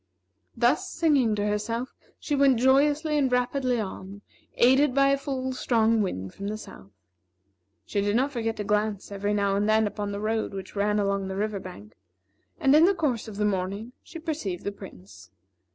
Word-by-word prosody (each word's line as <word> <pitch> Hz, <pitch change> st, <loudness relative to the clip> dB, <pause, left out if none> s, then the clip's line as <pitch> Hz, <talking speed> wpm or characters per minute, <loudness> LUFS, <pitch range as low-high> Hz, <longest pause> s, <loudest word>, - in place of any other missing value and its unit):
Thus, 240 Hz, +5 st, +2 dB
singing 285 Hz, -10 st, +2 dB
to 205 Hz, 0 st, -1 dB
herself, 230 Hz, +4 st, -2 dB, 0.3 s
she 295 Hz, -, -4 dB
went 275 Hz, -3 st, +4 dB
joyously 290 Hz, +4 st, +3 dB
and 265 Hz, -3 st, +1 dB
rapidly 250 Hz, 0 st, 0 dB
on, 200 Hz, 0 st, -7 dB, 0.3 s
aided 265 Hz, +2 st, +4 dB
by 275 Hz, 0 st, +4 dB
a 275 Hz, -, +3 dB
full, 260 Hz, -2 st, -3 dB
strong 230 Hz, -3 st, +2 dB
wind 95 Hz, -, -3 dB
from 200 Hz, -, -6 dB
the 215 Hz, +1 st, -3 dB
south. 100 Hz, -, -12 dB, 1.0 s
She 200 Hz, -, -1 dB
did 205 Hz, +1 st, 0 dB
not 265 Hz, +4 st, +1 dB
forget 225 Hz, -4 st, -2 dB
to 210 Hz, -, -3 dB
glance 210 Hz, 0 st, -1 dB
every 205 Hz, +1 st, -1 dB
now 200 Hz, -1 st, +1 dB
and 205 Hz, +2 st, +1 dB
then 220 Hz, 0 st, +4 dB
upon 205 Hz, 0 st, -3 dB
the 200 Hz, -, -4 dB
road 215 Hz, -1 st, -2 dB
which 195 Hz, +1 st, -8 dB
ran 210 Hz, +1 st, +1 dB
along 200 Hz, -1 st, 0 dB
the 190 Hz, -, -4 dB
river 210 Hz, 0 st, -2 dB
bank; 110 Hz, -, -11 dB, 0.7 s
and, 270 Hz, +1 st, +4 dB
in 315 Hz, +2 st, +7 dB
the 390 Hz, +2 st, +3 dB
course 270 Hz, -10 st, -1 dB
of 210 Hz, -2 st, -8 dB
the 210 Hz, -, +1 dB
morning, 200 Hz, +3 st, -2 dB
she -, -, -11 dB
perceived 300 Hz, -, -4 dB
the 200 Hz, -, -2 dB
Prince. 100 Hz, -, -13 dB
215 Hz, 185 wpm, -26 LUFS, 200-265 Hz, 1.0 s, in